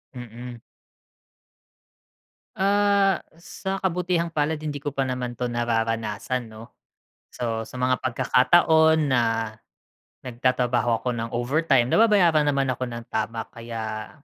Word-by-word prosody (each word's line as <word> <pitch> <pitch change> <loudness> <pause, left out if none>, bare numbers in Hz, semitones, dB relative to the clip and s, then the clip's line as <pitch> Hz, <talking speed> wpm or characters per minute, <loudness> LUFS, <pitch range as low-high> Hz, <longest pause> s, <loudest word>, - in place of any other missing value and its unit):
Mm. 120 0 -9 1.9
Ah, 200 -1 +2 0.2
sa 195 +2 -5
kabutihang 180 -2 0
palad 155 -1 -1
hindi 145 -2 -5
ko 145 - -2
pa 135 -1 -1
naman 125 -2 -4
'to 125 - 0
nararanasan 115 0 -2
'no. 110 +1 -11 0.7
So 115 -2 -3
sa - - -14
mga 130 0 +1
pagkakataon 160 +4 +3
na 120 -2 +3 1.0
nagtatrabaho 120 -2 0
ako 125 - 0
ng 115 0 -4
overtime 130 +1 +1
nababayaran 175 -9 +4
naman 140 -1 +1
ako 130 - -7
ng 115 0 -7
tama 115 -1 -2
kaya 110 -2 -6
125 Hz, 115 wpm, -24 LUFS, 120-160 Hz, 1.9 s, nababayaran